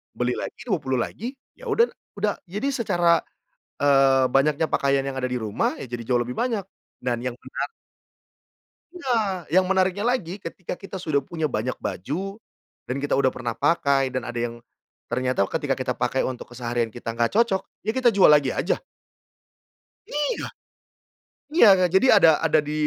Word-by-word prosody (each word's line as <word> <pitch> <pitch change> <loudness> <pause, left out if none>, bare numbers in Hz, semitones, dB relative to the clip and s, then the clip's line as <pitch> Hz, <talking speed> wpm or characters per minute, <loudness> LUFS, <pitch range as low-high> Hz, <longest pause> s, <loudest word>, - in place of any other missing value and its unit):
Beli 125 0 0
lagi - - -5
20 150 - -1
lagi 235 - -3 0.2
ya - - -10
uda 460 +2 +3 0.2
udah. 205 0 -1
Jadi 210 +10 -2
secara, 175 -9 +2 0.6
eee, 135 -2 +4
banyaknya 145 +4 +2
pakaian 140 0 +2
yang 135 - -5
ada 130 - -2
di 125 -1 -2
rumah 110 -2 0
ya 130 - -7
jadi 120 -1 -5
jauh 120 +1 +1
lebih 125 +1 -4
banyak 230 -5 0 0.4
dan 120 -1 -1
yang 125 - -1
menar - - -5 1.2
Nah, 225 - -1
yang 185 +4 +4
menariknya 190 +2 +1
lagi 220 -7 0
ketika 180 -2 -7
kita 195 0 -8
sudah 145 -5 0
punya 160 -1 -2
banyak 125 +2 -2
baju 185 - -4 0.5
dan 125 - -3
kita 145 -1 0
udah 135 -1 +3
pernah 120 -2 -4
pakai 140 -5 +2
dan 130 0 -3
ada 120 - -6
yang 120 0 -2 0.5
ternyata 125 -3 +1
ketika 135 -2 -1
kita 130 -1 -1
pakai 125 +2 0
untuk 125 -1 -6
keseharian 120 -1 -2
kita 115 -1 -5
gak 115 0 +1
cocok, 200 -3 +2 0.2
ya 220 - +1
kita 255 -2 +4
jual 195 -1 +6
lagi 145 -3 +5
aja. - - -1 1.3
Iya. 295 0 -1 1.1
Iya 325 - +7
ga 185 - +4
jadi 190 +8 +5
ada 165 - +7 0.2
ada 155 - +4
di 150 - -2
145 Hz, 165 wpm, -24 LUFS, 125-195 Hz, 1.3 s, Iya